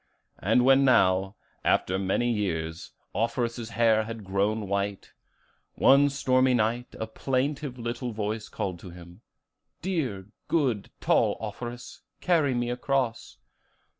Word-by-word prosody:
And 125 - +3
when 135 +1 +6
now, 95 -6 +3 0.3
after 95 +1 +1
many 100 +5 +1
years, 80 -7 -3 0.2
Offerus's 115 +2 -1
hair 110 -2 +4
had 115 -1 -7
grown 100 +2 -1
white, 100 0 -3 0.6
one 140 +1 +5
stormy 130 -2 +2
night 120 +2 -1
a 110 - -2
plaintive 135 +3 -2
little 120 +1 -4
voice 110 0 -3
called 90 -3 -4
to 90 - -10
him, 85 +3 -13 0.6
'Dear, 130 - -2 0.2
good, 130 -11 0
tall - - +2
Offerus, 120 0 -7 0.2
carry 155 -7 +2
me 120 0 -1
across. 125 -2 -2
115 Hz, 120 wpm, -27 LUFS, 100-130 Hz, 0.6 s, when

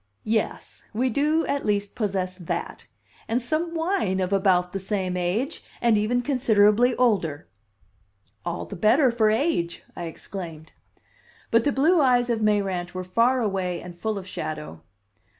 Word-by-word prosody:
"Yes. 220 0 -2
We 250 +3 +1
do 305 +6 +2
at 280 - -1
least 205 -1 -1
possess 190 -4 -2
that. 175 -3 -5 0.4
And 230 +2 +1
some 315 +7 -1
wine 325 - 0
of 185 +1 -1
about 185 -2 +2
the 195 - -2
same 190 -1 -2
date 185 - -1 0.2
and 235 -2 +3
even 220 +4 +1
considerably 240 -2 +3
older." 190 -12 +1 1.0
"All 175 0 -3
the 200 - -8
better 240 - +4
for 225 -2 +3
age," 215 - 0
I 175 - -5
exclaimed. 165 -2 -8 0.8
But 230 0 +4
the 290 - +3
blue 310 +6 +3
eyes 245 -2 +3
of 225 -1 -1
Mayrant 195 -4 0
were 185 - -3
far 235 +7 +2
away 190 -5 -1
and 175 -1 -10
full 215 +4 -2
of 190 - -6
shadow. 155 - -6
210 Hz, 150 wpm, -25 LUFS, 185-245 Hz, 1.0 s, better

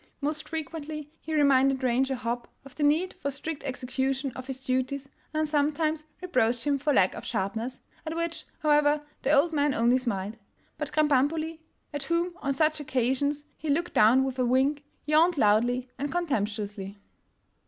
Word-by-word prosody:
Most 305 +1 -2
frequently 305 -1 -5
he 315 0 -4
reminded 270 -2 +4
Ranger 260 +2 +2
Hopp 240 -1 -3 0.2
of 275 - -12
the - - -8
need 310 +6 +2
for 280 - -2
strict 285 +2 -5
execution 265 +1 -2
of 255 0 -7
his 265 -1 -6
duties, 260 +2 -1 0.2
and 310 0 0
sometimes 305 +1 0 0.2
reproached 245 -8 +1
him 285 -1 +2
for 295 +2 +1
lack 190 -9 +4
of - - -7
sharpness 225 +4 -3
— - - -31
at 315 - -3
which, 335 -1 -3 0.2
however, 295 0 +4 0.2
the 265 - -1
old 305 +3 +4
man 290 -2 +2
only 240 +3 +4
smiled. 210 -3 -3 0.4
But 300 -2 -3
Krambambuli, 310 +2 +2 0.3
at 290 - -3
whom 340 +3 0
on 275 -1 -1
such 310 +2 +2
ocasions 270 +2 0
he 310 - -6
looked 335 +5 0
down 235 +5 +6
with 265 -1 -3
a - - +3
wink, 270 +4 +2 0.2
yawned 315 +3 +4
loudly 240 +3 +3
and 285 +1 -2
contemptuously. 210 - -2
280 Hz, 165 wpm, -28 LUFS, 255-305 Hz, 0.4 s, down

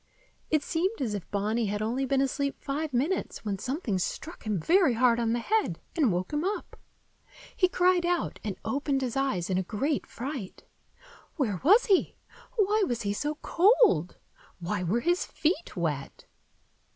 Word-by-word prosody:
It 305 -2 +2
seemed 370 +9 -1
as 240 -6 -1
if 200 -4 -5
Bonny 215 +3 0
had 205 +1 -2
only 240 +5 -1
been 270 +1 +2
asleep 280 +1 -1
five 295 +2 -3
minutes 275 +2 -1
when 200 -2 -2
something 250 - -2
struck 315 - -5
him 210 -4 0
very 335 - +4
hard 240 0 +4
on 230 -1 +1
the - - +1
head, 430 - 0 0.2
and 290 - +3
woke 180 +8 -2
him 295 +2 0
up. 400 +3 -3 0.8
He 365 - +3
cried 360 -1 +3
out, 350 0 -1
and 205 -3 -4
opened 275 +3 0
his 245 -3 -3
eyes 265 -11 0
in 185 - +2
a - - +1
great 260 - -2
fright. 255 -5 -6 0.7
Where 220 - -1
was 410 - +6
he? 390 -5 +2 0.4
Why 425 -1 +2
was 235 -2 -2
he 200 0 0
so 295 +8 -2
cold? 345 - +4 0.4
Why 180 +3 -3
were 190 +7 0
his 350 +4 +1
feet 330 +2 -2
wet? 150 -5 -3
265 Hz, 170 wpm, -28 LUFS, 210-335 Hz, 0.8 s, was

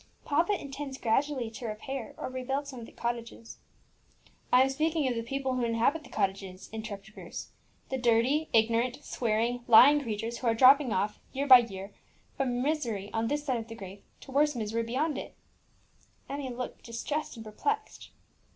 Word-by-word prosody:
"Papa 340 +7 +2
intends 275 -1 -6
gradually 250 0 0
to 230 +1 -6
repair 225 +3 -5
or - - -4
rebuild 265 +2 -3
some 260 -3 -7
of 230 - -9
the - - -14
cottages." 235 -1 -5 0.9
"I 250 +1 +7
am 265 - +1
speaking 310 +1 +1
of 250 - +1
the 230 - -2
people 265 +2 -2
who 250 -1 -1
inhabit 235 +7 +1
the - - -14
cottages," 190 -1 -3
interrupted 215 -1 -7
Bruce; - - -8 0.4
"the 265 - -2
dirty, 245 +6 +2
ignorant, 230 +4 +2
swearing, 235 +1 -1
lying 275 +6 +8
creatures 225 -1 -4
who 250 - -2
are 225 - +3
dropping 265 +2 +6
off, 205 +2 -1
year 275 +2 -1
by 260 -3 +10
year, 195 -4 -6 0.4
from 250 -2 -1
misery 235 -10 -1
on 225 0 0
this 290 +3 -1
side 260 -4 0
of 225 -1 -6
the 225 - -8
grave 195 -2 -10 0.2
to - - -11
worse 295 +1 +3
misery 225 0 -1
beyond 275 +6 -1
it." - - -9 0.9
Emmie 280 -1 -4
looked 250 0 -6
distressed 260 +7 -4
and 225 -1 -9
perplexed. 430 - -3
245 Hz, 175 wpm, -29 LUFS, 225-275 Hz, 0.9 s, by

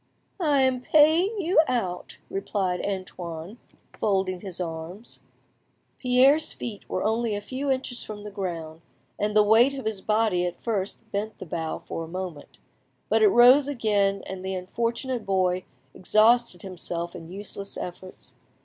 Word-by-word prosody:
"I 295 -6 +3
am 260 -1 +1
paying 320 - +4
you 345 -2 +4
out;" 190 -8 -2
replied 195 -2 -2
Antoine, 185 0 -5 0.4
folding 190 -3 0
his 190 -4 -8
arms. 170 +5 -6 0.8
Pierre's 265 +4 +4
feet 215 -4 -7
were - - -1
only 225 0 0
a - - -2
few 260 +7 -4
inches 260 -2 -1
from 210 -1 -8
the 210 - -7
ground, 165 -5 -5 0.4
and 210 0 0
the 210 - +7
weight 230 +6 +5
of 265 - -6
his 215 -3 -2
body 215 -4 +2
at 175 - -6
first 205 -4 -2
bent 210 +2 -3
the - - -8
bough 160 -1 -4
for 165 - -4
a - - -7
moment; 175 -3 -7 0.5
but - - +3
it 430 - +7
rose 260 -3 +7
again, 205 -7 +1
and 190 -1 -6
the 190 0 -3
unfortunate 235 +6 -2
boy 185 -1 +1 0.3
exhausted 215 0 +3
himself 175 -2 -5
in 165 -2 -9
useless 200 0 -7
efforts. 185 +1 -8
205 Hz, 150 wpm, -26 LUFS, 185-245 Hz, 0.8 s, the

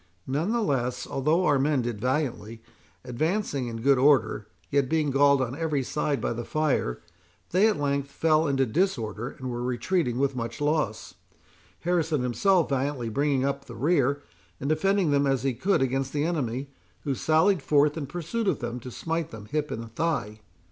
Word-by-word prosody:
Nonetheless, 140 - -1
although 155 +7 +1
our 145 -4 +3
men 140 -2 +1
did 115 -3 -4
valiantly, 125 -5 -2 0.4
advancing 145 - -1
in 115 -1 -5
good 135 -1 +4
order, 135 -6 +3 0.2
yet 140 -2 +2
being 155 -3 +1
galled 140 0 +4
on 125 +1 -4
every 155 -3 -1
side 145 +1 -1
by - - -1
the 120 +1 -4
fire, 135 - -1 0.5
they 190 +5 +4
at 215 - 0
length 140 -1 -1
fell 155 +1 +2
into 135 -1 +2
disorder, 120 - -1
and 130 -1 -6
were 120 0 -4
retreating 125 +2 0
with 135 0 +1
much 115 -1 -4
loss, 145 -8 -1 0.7
Harrison 165 -5 0
himself 175 +8 +2
valiantly 135 -3 -1
bringing 140 +2 +1
up 140 0 -2
the 120 - -10
rear, 140 +1 +1 0.4
and 135 - -4
defending 185 +2 +2
them 140 0 +3
as 135 -2 +1
he 135 -1 +1
could 135 - +1
against 135 +1 -1
the 145 0 0
enemy, 140 -5 -2 0.3
who 140 - -1
sallied 160 +6 +2
forth 145 +1 +3
in 150 -4 -4
pursuit 175 - -3
of - - +2
them, 120 -1 -4
to 125 - -8
smite 165 +5 -3
them 110 -2 -10
hip 150 0 -1
and 115 0 -6
thigh. 125 -11 -1
140 Hz, 175 wpm, -26 LUFS, 125-155 Hz, 0.7 s, good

